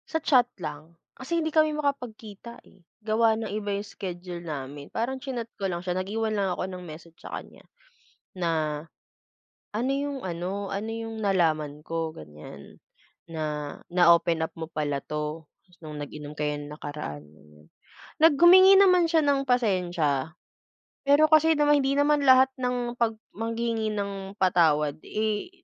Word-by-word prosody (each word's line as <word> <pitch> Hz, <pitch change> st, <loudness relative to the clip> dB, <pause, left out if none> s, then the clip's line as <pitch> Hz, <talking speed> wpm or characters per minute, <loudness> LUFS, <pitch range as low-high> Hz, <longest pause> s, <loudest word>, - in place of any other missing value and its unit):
Sa 320 Hz, -, 0 dB
chat 255 Hz, -6 st, +4 dB
lang. 155 Hz, -1 st, -8 dB, 0.2 s
Kasi 320 Hz, +6 st, -3 dB
hindi 315 Hz, -1 st, -1 dB
kami 310 Hz, -1 st, +3 dB
makapag-kita, 235 Hz, -6 st, -5 dB
eh, 190 Hz, -, -22 dB, 0.2 s
gawa 220 Hz, 0 st, +3 dB
ng 220 Hz, -2 st, -4 dB
iba 205 Hz, -1 st, -2 dB
yung 205 Hz, -, -5 dB
schedule 180 Hz, -3 st, -7 dB
namin. 145 Hz, -3 st, -7 dB
Parang 260 Hz, +4 st, -3 dB
chinat 245 Hz, -4 st, -5 dB
ko 195 Hz, -1 st, -1 dB
lang 175 Hz, 0 st, -4 dB
siya, 180 Hz, -, -1 dB
nag-iwan 215 Hz, +4 st, -2 dB
lang 200 Hz, -2 st, 0 dB
ako -, -, -2 dB
ng 185 Hz, -1 st, -7 dB
message 165 Hz, +1 st, -12 dB
sa -, -, -9 dB
kanya, -, -, -12 dB, 0.7 s
na 160 Hz, -4 st, -1 dB, 0.9 s
ano 235 Hz, +5 st, -1 dB
yung 280 Hz, 0 st, -2 dB
ano, 185 Hz, +3 st, -4 dB
ano 205 Hz, +3 st, -3 dB
yung 225 Hz, -1 st, -5 dB
nalaman 155 Hz, -6 st, 0 dB
ko 165 Hz, -1 st, -2 dB
ganiyan, 75 Hz, -, -13 dB, 0.4 s
na 150 Hz, -3 st, -4 dB, 0.2 s
na-open 170 Hz, -2 st, +4 dB
up -, -, -11 dB
mo 160 Hz, -1 st, -7 dB
pala 145 Hz, -3 st, -2 dB
'to, 150 Hz, +2 st, -5 dB, 0.3 s
nung 155 Hz, -2 st, -8 dB
nag-inom 150 Hz, 0 st, -8 dB
kayo 150 Hz, 0 st, -1 dB
nung 145 Hz, +1 st, -9 dB
nakaraan, 145 Hz, -, -6 dB
ganiyan. 75 Hz, 0 st, -21 dB, 0.5 s
Nag 320 Hz, 0 st, +6 dB
humingi 375 Hz, +2 st, +9 dB
naman 365 Hz, -3 st, +5 dB
siya 325 Hz, -1 st, +3 dB
ng 280 Hz, -2 st, +1 dB
pasensiya. 175 Hz, -, 0 dB, 0.7 s
Pero 285 Hz, +2 st, +5 dB
kasi 310 Hz, 0 st, +4 dB
naman 295 Hz, -1 st, +4 dB
hindi 275 Hz, +1 st, 0 dB
naman 290 Hz, 0 st, +3 dB
lahat 260 Hz, -1 st, +7 dB, 0.2 s
ng 245 Hz, -1 st, -1 dB
pag 230 Hz, -2 st, -1 dB, 0.2 s
maghihingi 225 Hz, 0 st, -2 dB
ng 200 Hz, -1 st, -5 dB
patawad, 155 Hz, -5 st, +2 dB
eh, 215 Hz, +8 st, -2 dB
195 Hz, 150 wpm, -26 LUFS, 155-245 Hz, 0.9 s, humingi